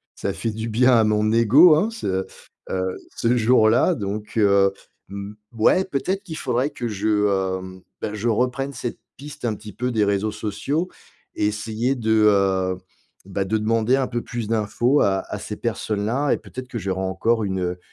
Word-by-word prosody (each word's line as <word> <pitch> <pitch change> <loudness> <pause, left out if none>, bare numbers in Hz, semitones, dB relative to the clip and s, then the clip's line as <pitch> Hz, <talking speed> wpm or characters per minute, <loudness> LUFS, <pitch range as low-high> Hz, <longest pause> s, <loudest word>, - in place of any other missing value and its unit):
ça 100 - -2
fait 110 +4 -3
du 110 +1 -4
bien 125 +4 +4
à 110 - +5
mon 105 0 +2
ego 130 +9 +7
hein. 190 +9 +1
Ce, 95 - -2 0.4
heu, 95 0 -2 0.2
ce 120 +2 +1
jour-là 120 +7 +4
donc 105 0 -5
heu, 100 -2 +4 0.4
mmh, 100 +1 -7 0.2
ouais, 185 +12 +4
peut-être 190 +5 -2
qu'il 160 -5 -7
faudrait 130 +5 0
que 120 -4 -4
je, 105 0 -2 0.5
hem, 95 0 -10 0.2
bah, 105 - -3
je 110 +3 -1
reprenne 125 +4 0
cette 120 -1 -5 0.2
piste 145 -3 -8
un 115 - +1
petit 105 -1 -11
peu 125 +1 -2
des 110 -3 +2
réseaux 100 +1 0
sociaux 110 - -2 0.5
et - - 0
essayer 110 +4 -1
de, 110 -2 +2
heu, 95 -2 +2 0.5
bah, 95 0 -2
de 110 +3 0
demander 115 +3 +2
un 130 - 0
peu 120 -1 -3
plus 120 -3 -5
d'infos 115 +5 +1
à 95 -1 +2
à - - -2
ces - - -6
personnes 105 -2 -2
là 135 +6 0
et - - +2
peut-être 130 0 -9
que 120 - -5
j'aurai 95 -2 -2
encore 100 +5 0
une, 95 -1 -2
heu, 90 0 -2
110 Hz, 185 wpm, -22 LUFS, 100-125 Hz, 0.5 s, ego